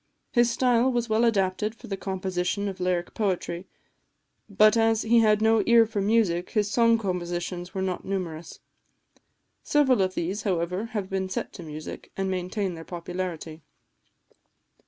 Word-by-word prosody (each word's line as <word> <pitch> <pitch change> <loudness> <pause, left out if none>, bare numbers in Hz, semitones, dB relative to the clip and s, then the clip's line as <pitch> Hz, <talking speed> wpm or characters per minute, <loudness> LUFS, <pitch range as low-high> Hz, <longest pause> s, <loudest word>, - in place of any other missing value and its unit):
His 240 0 +4
style 245 +1 +2
was 240 -2 -1
well 220 +2 +2
adapted 210 -1 +1
for - - -13
the 195 - -3
composition 190 +1 -2
of 195 -1 -5
lyric 180 -1 -1
poetry; 185 -3 -2 0.8
but 210 +2 +5
as 225 -1 +2
he 235 +1 +4
had 215 -1 +3
no 220 0 +4
ear 235 -1 +7
for 215 -2 -3
music, 195 -5 +1
his 210 -2 0
song 230 0 +4
compositions 175 -3 -3
are 190 - -1
not 185 -1 -3
numerous. 170 -4 -5 1.0
Several 265 -7 +3
of 185 0 0
these, 190 +5 -2
however, 180 +1 -1
have 195 -2 -2
been 190 0 -2
set 185 - -4
to - - -9
music, 155 -1 -8
and 195 0 -1
maintain 185 +1 -2
their 165 -1 -8
popularity. 170 -2 -5
195 Hz, 155 wpm, -26 LUFS, 180-220 Hz, 1.0 s, ear